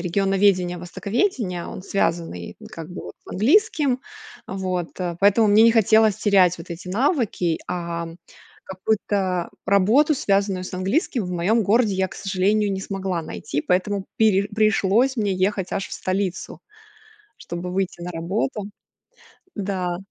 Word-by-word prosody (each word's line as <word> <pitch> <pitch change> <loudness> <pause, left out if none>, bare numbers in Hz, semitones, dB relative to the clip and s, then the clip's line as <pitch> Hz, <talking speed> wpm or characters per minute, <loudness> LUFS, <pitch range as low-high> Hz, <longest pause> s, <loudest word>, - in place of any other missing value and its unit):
Регионоведение, 185 0 +1
востоковедение, 200 - -2
он 185 - -8
связанный, 165 - -2
как 165 0 -8
бы 180 - -8
вот, - - -9
с - - -13
английским. 280 - +2 0.5
Вот, 185 -2 -3
а, 175 -2 -3
поэтому 205 +2 +5
мне 210 +2 +6
не 230 0 +6
хотелось 220 -1 +4
терять 190 -4 +4
вот 170 +1 -11
эти 170 +2 -7
навыки, 215 - 0
ам, 170 -1 -4 0.5
какую-то 190 -2 -1 0.2
работу, 220 +11 +4
связанную 195 -5 0
с - - -8
английским, 200 - 0
в - - -5
моём 205 +7 +2
городе 215 0 +3
я, 190 0 0
к - - -12
сожалению, 200 +2 +1
не 190 - -3
смогла 190 -3 -3
найти. 150 -2 -4
Поэтому 190 +3 0
пере 205 -3 +3
пришлось 215 +4 +2
мне 205 -3 0
ехать 190 0 -1
аж 195 - -2
в - - -13
столицу, 190 0 -3 0.8
чтобы 175 +1 -6
выйти 185 -2 -2
на 180 - -5
работу. 200 +6 -3 0.9
Да. 185 -4 -2
195 Hz, 140 wpm, -23 LUFS, 180-215 Hz, 0.9 s, мне